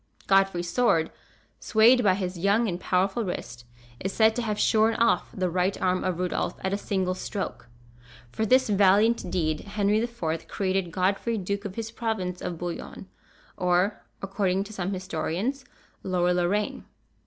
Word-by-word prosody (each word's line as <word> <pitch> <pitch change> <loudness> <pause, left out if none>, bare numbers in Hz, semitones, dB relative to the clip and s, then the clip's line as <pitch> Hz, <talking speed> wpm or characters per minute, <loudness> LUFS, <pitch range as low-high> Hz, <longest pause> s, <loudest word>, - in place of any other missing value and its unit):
Godfrey's 195 -3 +2
sword, 180 -7 +2 0.5
swayed 235 +3 +5
by 190 -3 +4
his 185 -1 -3
young 205 +5 +2
and 175 -3 -3
powerful 190 +6 0
wrist, 120 - -6 0.3
is 190 - -3
said 220 +1 +3
to 245 - -1
have 215 -3 -2
shorn 220 +1 +3
off 230 0 +2
the 185 -4 -1
right 180 +2 0
arm 185 0 +1
of 185 -2 -1
Rudolph 180 -1 -2
at 190 +1 -1
a - - +1
single 190 -3 -1
stroke. 190 - -5 0.6
For 220 - -2
this 255 +4 +4
valiant 205 +1 +3
deed, 155 -4 0
Henry 205 +1 0
IV. 200 -9 -3
created 190 -2 -1
Godfrey 195 +6 0
Duke 200 +1 -3
of 195 -2 -5
his 225 -1 -5
province 220 -6 -3
of 175 - -4
Bouillon; 175 +2 -6 0.5
or, 180 +3 +1 0.2
according 195 -1 0
to 210 +2 -11
some 190 -2 -3
historians, 190 - -3 0.4
Lower 180 -1 +1
Lorraine. 180 +4 -1
195 Hz, 155 wpm, -26 LUFS, 180-215 Hz, 0.6 s, swayed